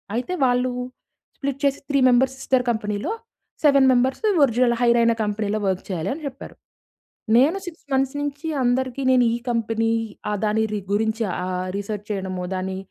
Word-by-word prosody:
అయితే 255 Hz, +10 st, -2 dB
వాళ్ళు 250 Hz, 0 st, +2 dB, 0.7 s
స్ప్లిట్ 275 Hz, -1 st, -3 dB
చేసి 275 Hz, 0 st, +1 dB
"3 280 Hz, -1 st, +2 dB
మెంబర్స్ 260 Hz, +2 st, +3 dB
సిస్టర్ 260 Hz, -2 st, +1 dB
కంపెనీలో, 210 Hz, -, -2 dB, 0.5 s
7 275 Hz, -2 st, +6 dB
మెంబరస్సు 260 Hz, -, +1 dB, 0.2 s
ఒరిజినల్ 240 Hz, 0 st, +2 dB
హైరైన 235 Hz, -1 st, +4 dB
కంపెనీలో 210 Hz, 0 st, -1 dB
వర్క్ 190 Hz, -1 st, -1 dB
చేయాలని" 190 Hz, -, -3 dB
చెప్పారు. 270 Hz, 0 st, -9 dB, 0.8 s
నేను 295 Hz, +9 st, +4 dB
6 335 Hz, -3 st, -9 dB
మంత్స్ 270 Hz, +1 st, +1 dB
నుంచి 290 Hz, +2 st, -4 dB, 0.2 s
అందరికి 255 Hz, +1 st, 0 dB
నేను 250 Hz, -1 st, +5 dB
ఈ -, -, -2 dB
కంపెనీ 225 Hz, -1 st, 0 dB, 0.4 s
ఆ -, -, 0 dB
దాని 220 Hz, +1 st, +1 dB
రి 210 Hz, -, -1 dB
గురించి 220 Hz, +2 st, 0 dB
ఆహ్, 185 Hz, 0 st, -3 dB
రిసర్చ్ 205 Hz, 0 st, -5 dB
చేయడము, 190 Hz, -2 st, -3 dB
దాని 190 Hz, 0 st, -3 dB
240 Hz, 150 wpm, -23 LUFS, 210-265 Hz, 0.8 s, 7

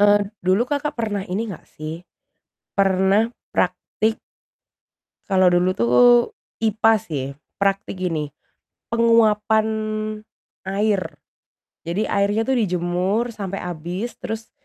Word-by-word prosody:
Eee, 205 Hz, 0 st, +6 dB, 0.2 s
dulu, 185 Hz, +5 st, +3 dB
Kakak, 290 Hz, +1 st, -1 dB
pernah 210 Hz, -3 st, -1 dB
ini 215 Hz, +5 st, -2 dB
enggak 170 Hz, -, -12 dB
sih 155 Hz, +2 st, -7 dB, 0.7 s
pernah 195 Hz, +2 st, +3 dB, 0.2 s
praktik 220 Hz, +1 st, 0 dB, 1.1 s
kalau 190 Hz, -2 st, +5 dB
dulu 175 Hz, +1 st, +3 dB
tuh 120 Hz, +1 st, +1 dB, 0.7 s
IPA 225 Hz, 0 st, +4 dB
sih, 145 Hz, -8 st, -4 dB, 0.3 s
praktik 195 Hz, 0 st, 0 dB
gini 155 Hz, -5 st, -1 dB, 0.6 s
penguapan 220 Hz, -2 st, +4 dB, 1.0 s
air. 195 Hz, 0 st, -1 dB, 0.7 s
Jadi 180 Hz, +6 st, 0 dB
airnya 200 Hz, +2 st, +1 dB
tuh 265 Hz, +1 st, +1 dB
dijemur 185 Hz, +4 st, 0 dB
sampai 195 Hz, -3 st, -5 dB
habis 180 Hz, +6 st, -5 dB
terus, 225 Hz, 0 st, -5 dB
200 Hz, 100 wpm, -22 LUFS, 180-220 Hz, 1.1 s, Eee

